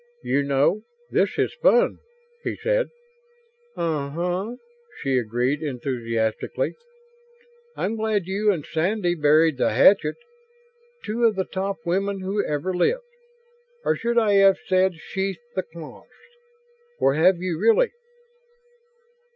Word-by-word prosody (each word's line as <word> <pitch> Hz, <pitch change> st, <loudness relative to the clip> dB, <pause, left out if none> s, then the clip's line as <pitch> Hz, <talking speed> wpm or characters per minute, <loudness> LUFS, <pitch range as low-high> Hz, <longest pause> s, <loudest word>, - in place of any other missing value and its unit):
"You 140 Hz, -, +1 dB
know, 140 Hz, +8 st, +2 dB, 0.3 s
this -, -, +1 dB
is -, -, 0 dB
fun," -, -, +3 dB, 0.4 s
he -, -, -2 dB
said. -, -, 0 dB, 0.9 s
"Uh 150 Hz, -4 st, -1 dB
huh," 180 Hz, +8 st, -2 dB, 0.4 s
she 135 Hz, -2 st, +1 dB
agreed 125 Hz, +6 st, -1 dB
enthusiastically. 120 Hz, -, -2 dB, 1.0 s
"I'm 220 Hz, +4 st, -2 dB
glad 215 Hz, -4 st, 0 dB
you 205 Hz, +3 st, +1 dB
and 165 Hz, -7 st, -3 dB
Sandy 175 Hz, +2 st, 0 dB
buried 155 Hz, -1 st, +3 dB
the -, -, +2 dB
hatchet. 195 Hz, -, +5 dB, 0.9 s
Two 230 Hz, +3 st, 0 dB
of 220 Hz, -2 st, +3 dB
the 190 Hz, -1 st, -1 dB
top 195 Hz, +1 st, -3 dB
women 195 Hz, +2 st, -1 dB
who 195 Hz, +2 st, -1 dB
ever 150 Hz, +5 st, -2 dB
lived. 485 Hz, -, +1 dB, 0.8 s
Or -, -, +2 dB
should 235 Hz, +1 st, -2 dB
I 220 Hz, -3 st, +4 dB
have 195 Hz, -1 st, +6 dB
said 185 Hz, -1 st, +2 dB
sheathed 190 Hz, +3 st, -4 dB, 0.2 s
the 190 Hz, -, 0 dB
claws? 165 Hz, -3 st, -12 dB, 0.9 s
Or 135 Hz, -, +3 dB
have 175 Hz, +5 st, +4 dB
you, 175 Hz, -2 st, -3 dB
really?" 230 Hz, -, +4 dB
185 Hz, 125 wpm, -24 LUFS, 150-205 Hz, 1.0 s, have